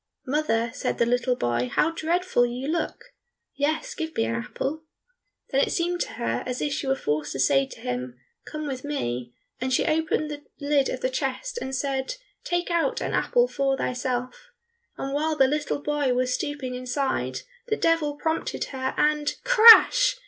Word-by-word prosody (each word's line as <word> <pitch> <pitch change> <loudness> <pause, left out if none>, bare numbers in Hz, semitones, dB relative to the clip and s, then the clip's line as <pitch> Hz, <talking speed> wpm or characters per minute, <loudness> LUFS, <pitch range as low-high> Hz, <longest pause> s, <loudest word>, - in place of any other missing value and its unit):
"Mother," 235 -5 0
said 285 - -2
the 235 - +3
little 245 +1 +1
boy, 120 - -1
"how 325 - +2
dreadful 335 -3 +1
you 245 +3 -2
look! 340 +9 -3 0.4
Yes, 315 - -1
give 320 -6 -5
me - - +2
an 115 - -2
apple." 270 - -3 0.7
Then 275 - +3
it - - +1
seemed 350 +1 0
to - - -3
her 115 +1 -2
as 250 0 -3
if 290 - -1
she 295 -2 -3
were 270 - +2
forced 150 - -2
to 135 - -5
say 135 +1 +3
to - - -12
him, 125 0 -4 0.2
"Come 305 0 -6
with 265 -3 -4
me," 125 - -3 0.2
and 260 +1 -2
she 250 - +2
opened 310 -1 0
the 290 0 -6 0.2
lid 285 -2 +2
of 255 - -4
the 255 - +1
chest 285 - -3
and 265 0 -3
said, 270 - -2 0.3
"Take 350 0 -1
out 340 +8 +1
an - - -3
apple 485 0 +2
for 275 - 0
thyself," 250 - -3 0.5
and 275 0 -4
while 310 +2 0
the 270 -3 +5
little 295 +1 -1
boy 290 -4 0
was 250 0 +1
stooping 285 -2 -3
inside, 255 +2 -2 0.3
the 435 - 0
Devil 325 -3 +1
prompted 320 +2 -2
her, 260 0 -2
and 300 -1 +1
crash! - - +8
280 Hz, 180 wpm, -25 LUFS, 250-320 Hz, 0.7 s, crash